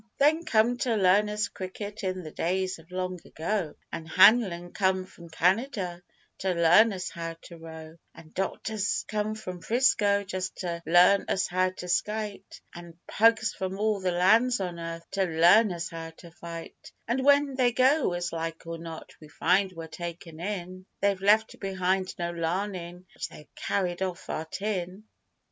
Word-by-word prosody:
They 290 +2 +5
come 240 -6 +2
to 250 -4 +1
learn 200 +1 +4
us 210 0 -1
cricket 205 +3 -7
in 185 -1 -2
the 155 - -8
days 185 +2 -1
of 165 +1 -18
long 185 0 -3
ago, 170 0 -3 0.2
An' 160 - -6
Hanlan 180 -1 +5
come 190 -2 +1
from 170 -2 -14
Canada 180 +1 0 0.4
to 185 -1 0
learn 175 +7 +6
us 180 -2 -5
how 165 -1 -5
to 170 - -11
row, 160 0 -10 0.2
An' 160 - -14
'doctors' 200 +2 -2
come 215 0 -2
from 185 -5 -7
'Frisco 205 -2 +2
just 185 -1 -4
to 170 -2 -3
learn 180 +4 +5
us 190 - +1
how 185 +1 +1
to 185 -1 -9
skite, 210 +3 -2
An' 170 -1 -11
'pugs' 225 0 +3
from 190 0 -4
all 210 0 +1
the 185 -1 -1
lands 220 +8 +4
on 175 -3 -4
earth 165 0 -6
to 195 -1 +1
learn 180 +6 +5
us 170 -1 -4
how 165 -1 -6
to 170 - -13
fight; 170 0 -10 0.2
An' 250 +3 0
when 285 0 +4
they 255 -2 +2
go, 260 - +3
as 175 0 -3
like 165 0 -4
or 165 0 -6
not, 165 -1 -9
we 155 - -12
find 185 +6 +1
we're 165 -2 -8
taken 170 0 -8
in, 185 0 -5
They've 200 -2 +1
left 215 +2 +3
behind 190 -1 -1
no 170 0 -2
larnin' 175 +1 -3
but - - -5
they've 150 - -15
carried 180 -2 -2
off 185 -1 -3
our 160 - -3
tin. 185 +1 -4
185 Hz, 170 wpm, -27 LUFS, 170-210 Hz, 0.4 s, learn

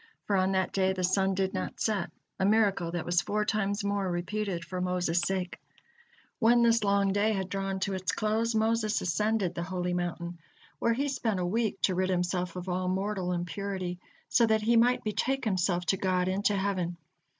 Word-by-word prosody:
For 205 - +1
on 190 0 +2
that 190 0 0
day 190 -1 +2
the 185 -1 -3
sun 190 +1 +2
did 190 0 0
not - - -4
set, 210 -5 0 0.3
a - - +1
miracle 200 -4 +3
that 175 -2 -3
was 175 0 +2
four 210 +1 -1
times 205 -1 0
more 200 -1 0
repeated 175 0 -2
for 185 +1 -4
Moses' 180 -1 +1
sake. 185 0 -2 0.8
When 235 0 +5
this 230 -1 +4
long 200 -1 +2
day 210 +2 +2
had 190 -2 -2
drawn 195 0 -2
to 195 - 0
its 185 -1 -1
close, 220 +2 0
Moses 220 -1 +1
ascended 205 +1 0
the - - -4
holy 180 0 -2
mountain, 175 -1 -3 0.4
where 230 - +2
he 275 +5 -1
spent 225 -7 -1
a 180 - 0
week 210 +1 0
to 190 - +3
rid 185 +1 0
himself 180 -1 -1
of 180 0 -6
all 185 0 -1
mortal 190 0 -1
impurity, 180 0 -3 0.3
so 235 -2 +4
that 220 -1 +2
he 235 +2 +3
might 245 +2 +4
betake 245 +5 -1
himself 180 -3 +1
to 195 - +1
God 185 -1 +1
into 200 +2 +1
heaven. 185 -3 -1
190 Hz, 195 wpm, -29 LUFS, 180-210 Hz, 0.8 s, When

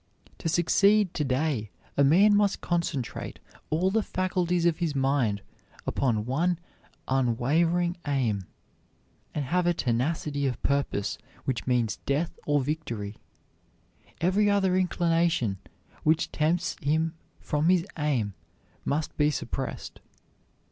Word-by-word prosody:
To 165 - -2
succeed 195 +4 +4
to 150 - -1
day 130 -5 0 0.3
a 140 - +4
man 195 +9 +6
must 205 -1 +2
concentrate 170 -7 -2 0.3
all 180 +5 +2
the 225 +2 +2
faculties 180 -3 0
of 170 -2 +3
his 165 -4 -1
mind 135 -7 +1 0.4
upon 115 -6 0
one 165 +8 +1 0.5
unwavering 155 +8 +2
aim, 115 -9 0 0.9
and 145 - -1
have 175 +5 +1
a 175 - +3
tenacity 140 +3 0
of 125 - -2
purpose 140 -7 0 0.3
which 130 -4 -2
means 120 -4 +1
death 145 +5 -1
or 145 -1 +3
victory. 120 -9 -4 1.0
Every 195 +4 +3
other 195 -2 +3
inclination 170 - +1 0.4
which 160 +1 +2
tempts 165 +3 0
him 160 +3 +1 0.3
from 150 +3 0
his 180 -2 +4
aim 135 -10 0 0.5
must 150 +2 -1
be 150 0 +4
suppressed. 150 - -4
155 Hz, 120 wpm, -27 LUFS, 130-175 Hz, 1.0 s, man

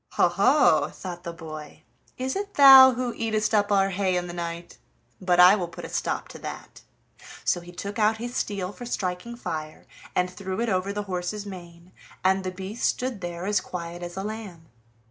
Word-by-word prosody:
"Ho, - - +4
ho!" 155 - +4
thought 175 -2 -8
the 170 - -5
boy, 155 -2 -10 0.3
"is 260 +1 -2
it 405 +1 -4
thou 265 -2 +10
who 245 -1 -2
eatest 220 -1 -1
up 205 -1 +2
our 195 -1 +3
hay 190 -1 0
in 175 - -2
the 175 - -7
night? 170 0 -6 0.4
but 180 -1 +2
I 180 +3 +9
will 180 -4 -3
put - - -9
a - - -8
stop - - -2
to - - -10
that." - - -9 0.6
So 175 - +1
he 175 +1 -12
took 200 +5 -6
out 215 +1 +3
his 240 +2 -6
steel 195 -3 -2
for 245 - -9
striking 185 +2 -3
fire, 155 -9 -6 0.3
and 180 - +2
threw 185 +1 -6
it 235 0 0
over 190 0 0
the 205 +1 -3
horse's 190 +2 -4
mane, 175 -2 -11 0.3
and 190 +1 +2
the 185 - -2
beast 190 +4 -2
stood 250 -5 -3
there 175 0 -5
as 205 0 +1
quiet 175 -1 -7
as 175 +1 -7
a 195 - -3
lamb. 205 -7 -7
190 Hz, 200 wpm, -25 LUFS, 175-215 Hz, 0.6 s, thou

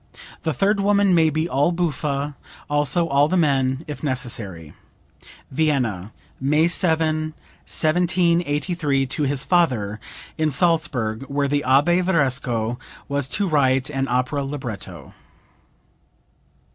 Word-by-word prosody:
The 160 - -1
third 200 +8 +1
woman 200 -1 +3
may 160 -2 +4
be 155 +2 -1
all 145 +3 +1
buffa, 150 -4 -2 0.3
also 145 +3 +1
all 140 0 +3
the 185 - 0
men 135 -2 +1
if 150 - -7
necessary." 115 - -3 0.8
(Vienna, 130 - 0 0.3
May 150 +5 +2
7, 160 -3 0 0.3
1783, 170 -3 +1
to 140 +3 -2
his 140 0 -1
father, 125 - +1 0.4
in 155 -1 +2
Salzburg, 135 -9 0
where 140 0 0
the 145 +1 0
Abbe 145 +8 +3
Varesco 130 -9 0 0.3
was 140 -2 -1
to 200 +5 0
write 135 -3 +2
an 135 -1 -1
opera 125 +3 0
libretto.) 110 - -7
145 Hz, 115 wpm, -22 LUFS, 130-165 Hz, 0.8 s, may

